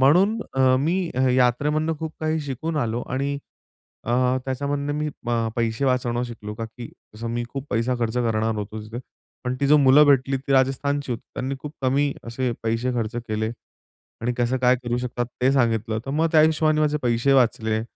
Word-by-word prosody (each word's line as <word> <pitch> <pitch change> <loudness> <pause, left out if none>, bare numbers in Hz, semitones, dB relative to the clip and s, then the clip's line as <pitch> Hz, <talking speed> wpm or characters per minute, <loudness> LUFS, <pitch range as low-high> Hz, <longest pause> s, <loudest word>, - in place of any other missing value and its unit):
म्हणून 180 +11 +4 0.2
अ, 135 - 0 0.2
मी 175 +3 0
अ, 130 - 0
यात्रेमधून 150 +6 +2
खूप 160 -1 -4
काही 155 0 0
शिकून 150 +3 -4
आलो 120 -3 -1
आणि 140 +2 -1 0.7
अ, 120 - -1 0.3
त्याच्यामधनं 140 +2 -2
मी 150 0 -1 0.2
अ, 115 -1 +1
पैसे 115 +3 0
वाचवणं 125 -2 +1
शिकलो, 105 -3 -7
का 115 - -5
की 115 +1 -9 0.3
जसं 115 +2 -5
मी 120 0 -2
खूप 135 +1 -6
पैसा 120 +2 +1
खर्च 115 0 -1
करणार 115 -2 +1
होतो 105 +1 -5
तिथे, 110 +3 -7 0.5
पण 125 - -1
ती 140 - +2
जी 150 +2 +6
मुलं 135 +3 +7
भेटली 135 -1 +3
ती 135 +1 -3
राजस्थानची 135 +1 +1
होती. 115 - -5
त्यांनी 135 +1 -3
खूप 150 0 -7
कमी 140 +2 +2
असे 120 +2 -2
पैसे 115 +3 0
खर्च 115 0 -2
केले 110 -2 -2 0.7
आणि 125 +1 0
कसं 120 +2 +1
काय 125 0 +4
करू 120 0 -1
शकतात 120 -1 -3 0.2
ते 130 - +5
सांगितलं, 115 -4 +1
तर - - -3
मग 160 +3 +1
त्या 155 - +7
हिशोबाने 155 -1 +3
माझे 150 0 +2
पैसे 120 +3 +2
वाचले 110 -4 +2
130 Hz, 185 wpm, -23 LUFS, 115-145 Hz, 0.7 s, मुलं